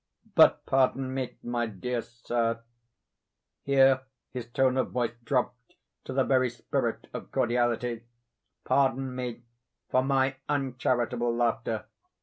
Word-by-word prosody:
But - - +6
pardon 130 0 +2
me, 130 -2 -3
my 120 -1 -1
dear 115 +4 -3
sir, 115 -1 -2 1.0
(here 135 -1 +4 0.3
his 125 -2 -5
tone 130 +1 +2
of 130 - +1
voice 120 -2 0
dropped - - -2 0.3
to - - -5
the 135 0 +3
very 130 -2 +3
spirit 120 0 -2
of - - -7
cordiality,) 120 -1 0 0.6
pardon 135 -1 +1
me 125 -2 -5 0.5
for 130 - +4
my 135 0 +1
uncharitable 125 -4 0
laughter. 120 -1 0
125 Hz, 120 wpm, -28 LUFS, 120-130 Hz, 1.0 s, But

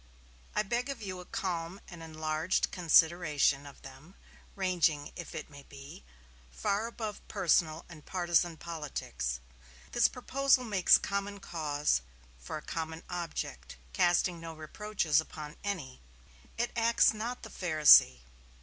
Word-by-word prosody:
I - - +2
beg 240 +6 -2
of 275 -5 -5
you 185 -2 -5
a 180 - -10
calm 185 -4 -3
and 175 -2 -11
enlarged 155 +1 -1
consideration 160 -5 +3
of 140 - -14
them, 135 +8 -13 0.4
ranging, 175 -6 +1
if 175 - -8
it 155 - -5
may 145 -1 -13
be, 140 - -12 0.5
far 200 - -1
above 220 -3 -6
personal 160 -1 +1
and 155 -4 -13
partizan 175 -2 +1
politics. 150 - -4 0.5
This 240 - +4
proposal 265 +1 +1
makes 205 -6 +5
common 200 0 -3
cause 150 - -1 0.4
for 60 - -6
a 150 - -9
common 160 0 -5
object, 170 - -5 0.2
casting 175 - +2
no 165 -1 -8
reproaches 160 -1 0
upon 150 -1 -9
any. 175 -11 -4 0.6
It 240 +1 -1
acts 230 -1 +4
not 230 +3 -5
the 220 - -9
Pharisee. 155 - +6
170 Hz, 130 wpm, -31 LUFS, 155-200 Hz, 0.6 s, Pharisee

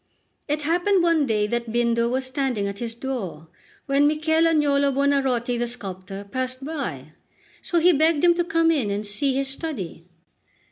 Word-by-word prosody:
It 295 0 -1
happened 350 +4 +2
one 330 -4 +3
day 210 -2 +1
that 235 +1 -3
Bindo 235 0 +1
was 260 +2 -1
standing 260 -6 -1
at 200 0 -6
his 230 -1 -4
door, 205 - -5 0.4
when 280 +1 +3
Michel 315 +2 +2
Agnolo 285 -3 +2
Buonarroti, 265 -3 +1
the 240 - 0
sculptor, 195 -4 -7
passed 255 +5 -4
by; 175 - -5 0.5
so 345 - -1
he 350 +2 +5
begged 315 +1 +2
him 350 -1 +6
to 345 0 0
come 330 -1 +2
in 270 -10 0
and 205 +1 -2
see 260 +6 0
his 275 0 0
study. 245 - -5
265 Hz, 170 wpm, -23 LUFS, 225-305 Hz, 0.5 s, him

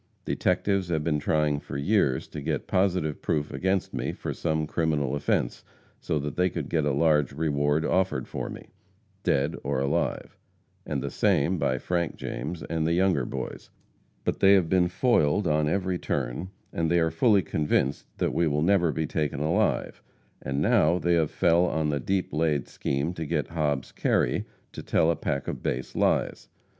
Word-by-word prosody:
Detectives 100 -2 0
have 80 -3 -1
been 75 -1 0
trying 75 -1 +1
for 70 - -7
years 70 -5 +1
to - - -6
get - - -2
positive 90 -5 0
proof 75 -1 -1
against 95 -1 -1
me - - -2
for - - -5
some 80 -2 -1
criminal 75 -4 0
offense, 70 -4 -1 0.4
so 80 - -1
that 75 -1 -3
they 90 +1 +2
could - - -5
get 80 -3 +1
a 75 - +2
large 75 -1 +2
reward 75 0 +1
offered 95 0 0
for - - -4
me, - - -10 0.5
dead 70 +4 +1
or - - -1
alive; 70 +1 -1 0.5
and - - -2
the - - -3
same - - +2
by 65 - +1
Frank 85 +3 -1
James 85 -1 -5
and 80 -1 -1
the 85 - +2
Younger 90 -8 +2
boys, - - -6 0.5
but - - -1
they 100 0 +6
have 95 -4 +4
been 90 -2 +3
foiled 100 - +2
on 75 -1 +2
every 95 0 -1
turn, - - -3 0.2
and 80 -1 0
they 85 - +3
are 80 -1 +1
fully 100 +4 +3
convinced 75 -2 0
that - - 0
we 85 - +2
will 75 0 +1
never 90 -2 +3
be 80 +3 -2
taken 75 -2 -2
alive, 80 +3 0 0.4
and 70 +1 -2
now 90 -3 +3
they 85 -1 +1
have 80 -3 +2
fell 85 +1 +3
on 80 -2 0
the 75 -1 0
deep 95 +5 -1
laid 75 -3 +1
scheme 70 +5 -2
to 80 - -5
get 75 -1 -2
Hobbs 75 -5 -1
Kerry - - +1 0.3
to - - -7
tell 80 - +2
a - - 0
pack 70 -2 -3
of - - -4
base 65 +1 -3
lies. - - 0
80 Hz, 180 wpm, -27 LUFS, 75-90 Hz, 0.5 s, they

